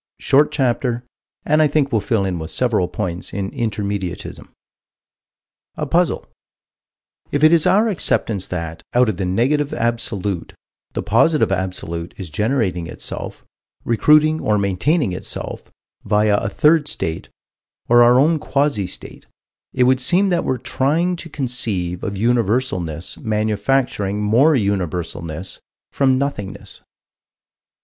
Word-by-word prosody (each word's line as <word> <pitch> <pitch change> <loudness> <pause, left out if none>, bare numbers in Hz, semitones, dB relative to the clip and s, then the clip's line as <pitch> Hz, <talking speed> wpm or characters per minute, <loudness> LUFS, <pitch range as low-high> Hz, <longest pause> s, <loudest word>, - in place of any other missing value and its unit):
Short 145 +2 +3
chapter, 125 -3 0 0.4
and 155 +1 +3
I 155 - +5
think 145 -1 +1
we'll 110 -3 +1
fill 100 0 0
in 90 -3 -2
with 80 0 -6
several 110 -7 +1
points 90 0 -4
in 100 0 -3
Intermediatism. 100 -5 -4 1.3
A - - -3
puzzle: - - +1 1.1
If 145 +1 0
it 155 +2 +7
is 165 -2 +4
our 210 +4 +4
acceptance 110 - 0
that, 85 -2 -5
out 125 -1 +4
of 100 - -2
the 95 -2 -2
Negative 135 +10 +1
Absolute, 105 -6 -2 0.4
the - - -3
Positive 130 +6 +3
Absolute 90 -3 -4
is 90 -5 -7
generating 100 - -1
itself, - - -7 0.4
recruiting, 150 +7 +4
or 105 -1 +1
maintaining, 100 - +1
itself, 90 - -6 0.3
via 105 0 +2
a 100 - -2
third 150 +5 +3
state, 80 - -4 0.6
or 120 0 +6
our 120 +1 +6
own 155 +3 +3
quasi 140 -9 0
state, - - -10 0.4
it 125 - +2
would 130 +1 +3
seem 185 +9 +3
that 175 -2 +1
we're 130 - -1
trying 160 +9 0
to 165 - -8
conceive 110 - -3
of 100 -2 -3
Universalness 105 -7 -1
manufacturing 105 -1 0
more 120 +9 +4
Universalness 90 - -2 0.3
from 130 -2 +2
Nothingness. 130 -8 -5
115 Hz, 130 wpm, -20 LUFS, 95-140 Hz, 1.3 s, it